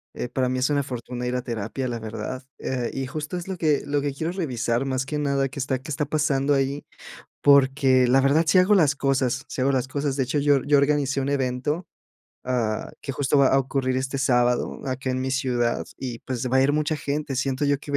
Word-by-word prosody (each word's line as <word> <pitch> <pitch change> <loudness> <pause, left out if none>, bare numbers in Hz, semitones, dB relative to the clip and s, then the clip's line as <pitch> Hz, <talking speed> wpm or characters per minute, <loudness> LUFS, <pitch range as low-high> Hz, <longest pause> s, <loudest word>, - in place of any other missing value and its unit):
eh, - - -3
para 125 +1 -1
mí 130 - -1
es 130 - +1
una 145 -1 +2
fortuna 125 -1 -5
ir 125 - -1
a 125 - -2
terapia, 120 +2 -3
la 120 -1 -3
verdad, 110 +4 -5
eh, 125 -2 -2
y 135 -1 -3
justo 150 +5 -5
es 175 - -6
lo 190 -1 -4
que 155 -4 +1
lo 145 0 0
que 140 -1 -2
quiero 160 +4 -3
revisar 125 -7 -1
más 130 0 -1
que 150 +1 -3
nada, 140 -2 0
qué 140 - -8
está 130 -1 -1
qué 155 +4 -9
está 150 +1 -1
pasando 145 -2 +1
ahí, 135 +1 -1 0.6
porque 135 -2 +5
la 135 +2 +5
verdad 140 +5 +3
sí 185 - +5
hago 185 +3 +5
las 150 -6 +3
cosas 135 -1 0
sí - - -5
hago 135 +2 +2
las 130 -2 +1
cosas, 140 +1 -2
de 135 - +1
hecho, 140 +4 -1
yo 145 -2 +3
yo 145 -1 +4
organicé 140 -1 +1
un 135 - -2
evento, 140 +4 -1 0.6
ah, 120 -4 -1
que 135 - -5
justo 140 +1 +1
va 135 - +5
a 135 - +4
ocurrir 130 -1 -1
este 135 +1 -2
sábado 125 -2 +1
acá 130 0 -3
en 130 0 -1
mi 130 0 -2
ciudad 125 -3 0
y 125 -3 -5
pues 125 -1 -4
va 130 - +3
a 130 - +5
ir 140 - +3
mucha 155 +1 0
gente, 145 -1 -3
siento 135 +2 -1
yo 140 -1 +2
que 145 0 -9
va - - +3
135 Hz, 235 wpm, -24 LUFS, 130-145 Hz, 0.6 s, porque